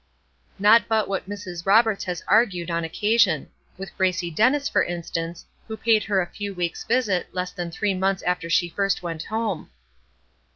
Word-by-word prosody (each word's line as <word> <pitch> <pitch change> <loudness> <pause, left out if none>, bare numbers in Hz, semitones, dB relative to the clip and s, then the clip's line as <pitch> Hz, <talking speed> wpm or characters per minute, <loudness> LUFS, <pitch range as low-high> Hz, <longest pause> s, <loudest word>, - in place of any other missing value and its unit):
Not 215 +4 +5
but 220 -1 +1
what 195 -1 -3
Mrs. 185 -3 -7
Roberts 220 0 +4
has 180 -2 -4
argued, 185 -7 +2
on 170 0 -1
occasion, 205 -1 +1 0.3
with 195 +1 -8
Gracie 185 -2 0
Dennis, 260 - +2
for - - +2
instance, 170 -1 -5 0.2
who 220 -1 -6
paid 220 -2 +2
her 200 -3 +1
a - - -1
few 205 -1 -5
weeks' 175 -2 -3
visit, 225 -7 0
less 180 0 -2
than 175 -1 -5
three 200 +4 -1
months 190 +1 0
after 180 -2 -1
she 175 +1 +3
first 195 +2 -1
went 165 -2 -4
home. 220 - -3
190 Hz, 170 wpm, -24 LUFS, 175-215 Hz, 0.3 s, Not